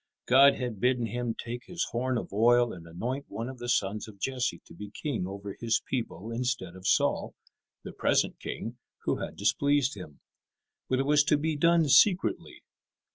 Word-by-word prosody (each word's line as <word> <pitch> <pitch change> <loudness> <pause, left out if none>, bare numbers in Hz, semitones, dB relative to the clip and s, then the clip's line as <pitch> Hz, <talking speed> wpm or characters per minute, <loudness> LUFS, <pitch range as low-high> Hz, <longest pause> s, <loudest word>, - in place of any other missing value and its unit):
God 135 +2 +6
had 120 -5 -4
bidden 125 +1 +2
him 120 0 -3
take 120 +1 -6
his 175 -2 -2
horn 125 +1 -1
of 115 - -6
oil 120 +2 +4
and 85 -2 -11
anoint 120 +12 -4
one 115 +2 -5
of 130 -1 -8
the 120 0 -5
sons 105 -1 0
of 105 -2 -12
Jesse 125 -5 -2
to - - -15
be 105 +4 -9
king 120 - -3
over 100 +1 -7
His 115 -1 +1
people 115 -4 -4
instead 115 -7 -2
of 95 0 -6
Saul, - - +1 0.5
the - - -8
present - - +1
king, - - -6 0.2
who - - 0
had - - -6
displeased 140 +6 +1
Him. 85 -7 -11 0.7
But 130 - +2
it 135 - 0
was 145 0 +4
to 150 - +3
be 155 +1 -1
done 170 +1 +3
secretly. 180 +7 +3
120 Hz, 185 wpm, -28 LUFS, 105-135 Hz, 0.7 s, God